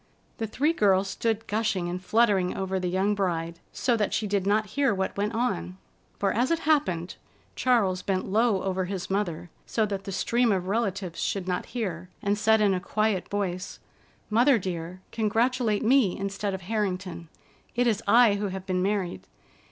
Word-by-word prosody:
The 225 Hz, -, -1 dB
three 295 Hz, +9 st, +1 dB
girls 195 Hz, -, +3 dB
stood 225 Hz, -1 st, -1 dB
gushing 205 Hz, -4 st, -1 dB
and 180 Hz, +1 st, -4 dB
fluttering 205 Hz, -4 st, +2 dB
over 190 Hz, 0 st, -1 dB
the 180 Hz, -1 st, -1 dB
young 190 Hz, +3 st, +1 dB
bride, 170 Hz, -4 st, -2 dB
so 245 Hz, -2 st, +1 dB
that 210 Hz, -2 st, 0 dB
she 220 Hz, -, 0 dB
did 200 Hz, -2 st, 0 dB
not 210 Hz, 0 st, +1 dB
hear 275 Hz, -7 st, +2 dB
what 190 Hz, 0 st, -2 dB
went 210 Hz, +3 st, -1 dB
on. 90 Hz, -, -1 dB, 0.4 s
For, 195 Hz, -1 st, +1 dB
as 245 Hz, +3 st, +1 dB
it 330 Hz, 0 st, +1 dB
happened, 190 Hz, -, +1 dB, 0.4 s
Charles 205 Hz, -8 st, +2 dB
bent 190 Hz, -2 st, -1 dB
low 215 Hz, -1 st, +2 dB
over 190 Hz, -1 st, -1 dB
his 190 Hz, 0 st, -5 dB
mother, 175 Hz, -4 st, -2 dB, 0.2 s
so 220 Hz, -, +1 dB
that 200 Hz, -2 st, -4 dB
the 195 Hz, -, -4 dB
stream 235 Hz, +5 st, +2 dB
of 185 Hz, -2 st, 0 dB
relatives 195 Hz, -4 st, -2 dB
should 190 Hz, -2 st, -2 dB
not 180 Hz, -, -2 dB
hear, 180 Hz, -5 st, -3 dB
and 200 Hz, 0 st, 0 dB
said 220 Hz, +1 st, +3 dB
in 205 Hz, -2 st, +4 dB
a 185 Hz, -, 0 dB
quiet 210 Hz, 0 st, -1 dB
voice: 185 Hz, -3 st, -3 dB, 0.5 s
"Mother 245 Hz, +4 st, +5 dB
dear, 180 Hz, -2 st, -5 dB
congratulate 225 Hz, 0 st, +1 dB
me 245 Hz, -5 st, +4 dB
instead 200 Hz, 0 st, -2 dB
of 190 Hz, -, -7 dB
Harrington. 185 Hz, -4 st, -3 dB, 0.5 s
It 245 Hz, +1 st, +2 dB
is 225 Hz, -3 st, +1 dB
I 235 Hz, -2 st, +6 dB
who 205 Hz, 0 st, -1 dB
have 190 Hz, -1 st, -6 dB
been 185 Hz, -1 st, 0 dB
married. 185 Hz, -, -2 dB
200 Hz, 180 wpm, -27 LUFS, 185-220 Hz, 0.5 s, I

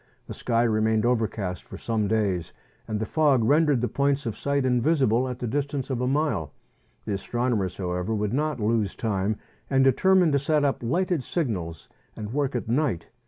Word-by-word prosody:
The -, -, -7 dB
sky 115 Hz, -1 st, 0 dB
remained 110 Hz, -1 st, +2 dB
overcast 110 Hz, -6 st, -1 dB
for 95 Hz, -, -10 dB
some 110 Hz, -1 st, -1 dB
days, 100 Hz, -6 st, 0 dB, 0.3 s
and 110 Hz, -1 st, -2 dB
the 110 Hz, -, -1 dB
fog 145 Hz, -3 st, +3 dB
rendered 145 Hz, 0 st, +3 dB
the 125 Hz, -, +1 dB
points 140 Hz, +4 st, 0 dB
of 110 Hz, -, -3 dB
sight 140 Hz, +3 st, 0 dB
invisible 130 Hz, -1 st, +2 dB
at 125 Hz, -, -5 dB
the 125 Hz, -, -4 dB
distance 140 Hz, +2 st, -2 dB
of 125 Hz, -2 st, -1 dB
a 125 Hz, -, 0 dB
mile. 135 Hz, -, 0 dB, 0.5 s
The 105 Hz, -, -2 dB
astronomers, 110 Hz, -1 st, -1 dB
however, 90 Hz, +3 st, -2 dB
would 105 Hz, +1 st, -1 dB
not 150 Hz, -1 st, 0 dB
lose 105 Hz, -2 st, 0 dB
time, 105 Hz, -1 st, -1 dB, 0.3 s
and 135 Hz, -1 st, +3 dB
determined 180 Hz, +6 st, +4 dB
to 140 Hz, -, +3 dB
set 145 Hz, +1 st, +1 dB
up 140 Hz, -, 0 dB
lighted 170 Hz, +5 st, 0 dB
signals 95 Hz, -, -3 dB, 0.3 s
and 105 Hz, +1 st, -6 dB
work 140 Hz, -2 st, 0 dB
at 120 Hz, -, -2 dB
night. 120 Hz, -, -1 dB
120 Hz, 180 wpm, -25 LUFS, 105-140 Hz, 0.5 s, determined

